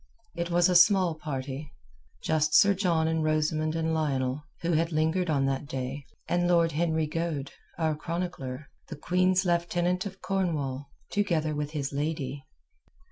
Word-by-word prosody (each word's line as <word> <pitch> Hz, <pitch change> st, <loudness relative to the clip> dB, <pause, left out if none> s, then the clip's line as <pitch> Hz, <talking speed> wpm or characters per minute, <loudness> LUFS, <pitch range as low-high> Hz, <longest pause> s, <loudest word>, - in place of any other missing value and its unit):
It 170 Hz, 0 st, -3 dB
was 175 Hz, +1 st, +4 dB
a 185 Hz, -, +2 dB
small 185 Hz, -1 st, +6 dB
party. 140 Hz, -1 st, -5 dB, 0.5 s
Just 155 Hz, -1 st, +1 dB
Sir 200 Hz, 0 st, +7 dB
John 175 Hz, -5 st, +1 dB
and 160 Hz, -1 st, 0 dB
Rosamund 155 Hz, 0 st, 0 dB
and 160 Hz, 0 st, 0 dB
Lionel, 140 Hz, -3 st, -1 dB, 0.2 s
who 170 Hz, -, 0 dB
had 165 Hz, +1 st, +1 dB
lingered 160 Hz, +3 st, +1 dB
on 140 Hz, -3 st, +2 dB
that 135 Hz, +1 st, -1 dB
day, 135 Hz, +1 st, -5 dB, 0.2 s
and 175 Hz, 0 st, +1 dB
Lord 170 Hz, -2 st, +3 dB
Henry 160 Hz, 0 st, 0 dB
Goade—our 160 Hz, 0 st, -3 dB
chronicler—the 155 Hz, -4 st, -6 dB
Queen's 185 Hz, +4 st, +2 dB
Lieutenant 175 Hz, +2 st, 0 dB
of 190 Hz, -1 st, -10 dB
Cornwall, 155 Hz, -8 st, -2 dB, 0.2 s
together 165 Hz, -7 st, 0 dB
with 150 Hz, 0 st, -2 dB
his 140 Hz, -2 st, -3 dB
lady. 140 Hz, -2 st, -3 dB
160 Hz, 140 wpm, -28 LUFS, 145-175 Hz, 0.5 s, Sir